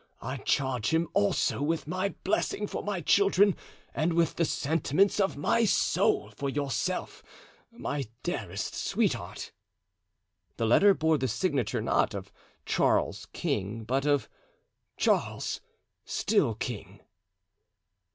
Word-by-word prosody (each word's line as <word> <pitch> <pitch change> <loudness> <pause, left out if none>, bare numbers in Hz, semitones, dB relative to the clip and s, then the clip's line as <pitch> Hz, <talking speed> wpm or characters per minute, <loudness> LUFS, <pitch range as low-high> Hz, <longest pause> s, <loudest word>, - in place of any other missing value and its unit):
I 130 +3 -3
charge 130 -5 0
him 165 +1 +1
also 200 -7 +1
with 160 +3 0
my 185 +5 -2
blessing 210 +1 0
for - - -4
my 200 -4 -3
children 200 +2 +4 0.4
and 160 +4 0
with 165 -1 +2
the 170 - +2
sentiments 160 +7 +1
of 195 -6 +1
my 230 +10 +2
soul 215 - +2
for 140 - -2
yourself, 140 +5 -2 0.5
my 145 - -4 0.2
dearest - - -3
sweetheart." - - -2 1.1
The 115 - 0
letter 195 - +6
bore 160 -1 +2
the 130 - 0
signature, 135 - -1
not - - +1
of - - -7 0.3
"Charles, - - +1
King," 105 +4 -2
but 135 +5 0
of 145 -2 +2 0.7
"Charles—still 225 - -1
king." 110 -4 -6
155 Hz, 115 wpm, -29 LUFS, 135-195 Hz, 1.1 s, letter